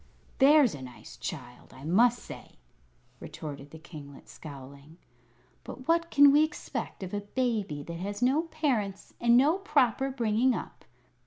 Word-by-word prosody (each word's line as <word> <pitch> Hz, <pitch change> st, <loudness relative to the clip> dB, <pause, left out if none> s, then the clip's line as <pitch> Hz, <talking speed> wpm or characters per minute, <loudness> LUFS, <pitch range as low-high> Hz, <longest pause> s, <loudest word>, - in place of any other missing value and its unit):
"There's 280 Hz, -2 st, +6 dB
a 140 Hz, -, -8 dB
nice 120 Hz, -4 st, -11 dB
child, 125 Hz, -8 st, -8 dB
I 130 Hz, -, -13 dB
must 230 Hz, +10 st, +3 dB
say!" -, -, -11 dB, 0.7 s
retorted 145 Hz, -2 st, -8 dB
the 160 Hz, -, -11 dB
kinglet, 150 Hz, -4 st, -12 dB
scowling. 140 Hz, +1 st, -12 dB, 0.7 s
"But 255 Hz, -, -10 dB
what 335 Hz, 0 st, +2 dB
can 285 Hz, -2 st, +7 dB
we 295 Hz, +2 st, +5 dB
expect 280 Hz, -9 st, -5 dB
of 185 Hz, -, -7 dB
a 205 Hz, -, -2 dB
baby 205 Hz, -, -2 dB
that 170 Hz, +2 st, -7 dB
has 200 Hz, +2 st, -4 dB
no 260 Hz, +6 st, +3 dB
parents 230 Hz, -, -2 dB
and 235 Hz, 0 st, +5 dB
no 300 Hz, +8 st, +3 dB
proper 270 Hz, -, +1 dB
bringing 240 Hz, -1 st, +1 dB
up? -, -, -8 dB
215 Hz, 150 wpm, -28 LUFS, -, 0.7 s, can